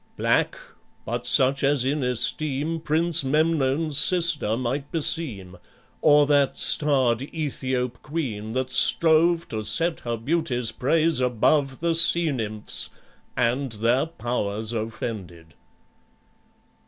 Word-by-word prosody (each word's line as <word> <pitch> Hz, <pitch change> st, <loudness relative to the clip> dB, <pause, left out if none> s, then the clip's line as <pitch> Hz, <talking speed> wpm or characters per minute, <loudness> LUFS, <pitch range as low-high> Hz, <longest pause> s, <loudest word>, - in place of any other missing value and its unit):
Black, -, -, 0 dB, 0.5 s
but 120 Hz, +2 st, -4 dB
such 135 Hz, +1 st, +3 dB
as 140 Hz, -2 st, +2 dB
in 145 Hz, +2 st, -1 dB
esteem 145 Hz, +5 st, -1 dB
Prince 160 Hz, 0 st, 0 dB
Memnon's 150 Hz, 0 st, +1 dB
sister 165 Hz, -, +2 dB
might 130 Hz, +3 st, -4 dB
beseem, 125 Hz, -, -2 dB, 0.4 s
Or 150 Hz, -1 st, +5 dB
that 145 Hz, -2 st, +1 dB
starred 130 Hz, -6 st, +2 dB
Aethiop 130 Hz, -5 st, -3 dB
queen 120 Hz, -9 st, -5 dB
that 130 Hz, 0 st, -3 dB
strove 165 Hz, +4 st, +3 dB
To 110 Hz, -1 st, -4 dB
set 165 Hz, +10 st, 0 dB
her 120 Hz, -1 st, -4 dB
beauty's 125 Hz, -3 st, -1 dB
praise 160 Hz, +4 st, +1 dB
above 130 Hz, +3 st, 0 dB
The 170 Hz, 0 st, +1 dB
sea 165 Hz, 0 st, +4 dB
nymphs, 110 Hz, -5 st, -1 dB, 0.5 s
and 125 Hz, +1 st, -1 dB
their 120 Hz, +7 st, 0 dB
powers 115 Hz, -7 st, -4 dB
offended." 105 Hz, -7 st, -6 dB
135 Hz, 110 wpm, -24 LUFS, 120-155 Hz, 0.5 s, Or